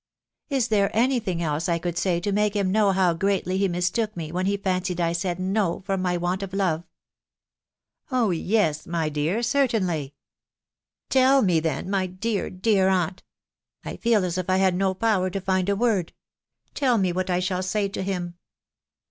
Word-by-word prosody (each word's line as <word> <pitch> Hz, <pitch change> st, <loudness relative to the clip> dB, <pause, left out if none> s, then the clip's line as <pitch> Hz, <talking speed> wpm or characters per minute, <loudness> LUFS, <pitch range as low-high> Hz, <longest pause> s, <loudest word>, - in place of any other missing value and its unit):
" -, -, -64 dB
Is 265 Hz, -4 st, 0 dB
there 200 Hz, -2 st, +3 dB
any 250 Hz, +2 st, +3 dB
thing 185 Hz, -6 st, -3 dB
else 155 Hz, +2 st, -1 dB
I 170 Hz, -, +2 dB
could 170 Hz, 0 st, -4 dB
say 175 Hz, -1 st, +1 dB
to 205 Hz, -, -1 dB
make 210 Hz, +1 st, +1 dB
him 195 Hz, -2 st, +1 dB
know 205 Hz, -1 st, +3 dB
how 185 Hz, -2 st, +2 dB
greatly 190 Hz, +1 st, 0 dB
he 200 Hz, -, +2 dB
mistook 185 Hz, +4 st, -1 dB
me 160 Hz, -2 st, -5 dB
when 185 Hz, +2 st, -1 dB
he 200 Hz, 0 st, +1 dB
fancied 185 Hz, -2 st, -2 dB
I 170 Hz, -1 st, +1 dB
said 175 Hz, 0 st, -2 dB
no 190 Hz, -1 st, 0 dB
from 195 Hz, -1 st, -2 dB
my 180 Hz, -1 st, 0 dB
want 175 Hz, +2 st, -1 dB
of 195 Hz, -1 st, -6 dB
love? 175 Hz, -4 st, 0 dB, 0.5 s
" -, -, -69 dB, 0.2 s
" -, -, -40 dB
Oh 245 Hz, -6 st, +2 dB
yes! 170 Hz, -3 st, 0 dB
my 165 Hz, -2 st, -1 dB
dear, 155 Hz, +9 st, -1 dB
certainly/' 205 Hz, -, 0 dB, 0.5 s
" -, -, -67 dB
Tell 265 Hz, +1 st, +5 dB
me 180 Hz, -5 st, +3 dB
then, 160 Hz, +2 st, -2 dB
my 190 Hz, -1 st, 0 dB
dear, 195 Hz, +3 st, -2 dB
dear 190 Hz, 0 st, +2 dB
aunt!.... 185 Hz, -1 st, 0 dB, 0.6 s
I -, -, -5 dB
feel 225 Hz, -5 st, +2 dB
as 180 Hz, 0 st, -2 dB
if 185 Hz, -, -4 dB
I 185 Hz, -, +3 dB
had 190 Hz, -1 st, +3 dB
no 190 Hz, +1 st, 0 dB
power 195 Hz, -3 st, +1 dB
to 195 Hz, -, -3 dB
find 190 Hz, 0 st, 0 dB
a 200 Hz, -, +2 dB
word.... 205 Hz, -6 st, 0 dB, 0.6 s
tell 255 Hz, -5 st, +2 dB
me 190 Hz, -3 st, +1 dB
what 185 Hz, +1 st, -2 dB
I 180 Hz, 0 st, +1 dB
shall 185 Hz, 0 st, -1 dB
say 200 Hz, +2 st, 0 dB
to 195 Hz, -, -5 dB
him." 175 Hz, -2 st, -4 dB
185 Hz, 200 wpm, -24 LUFS, 175-205 Hz, 0.6 s, Tell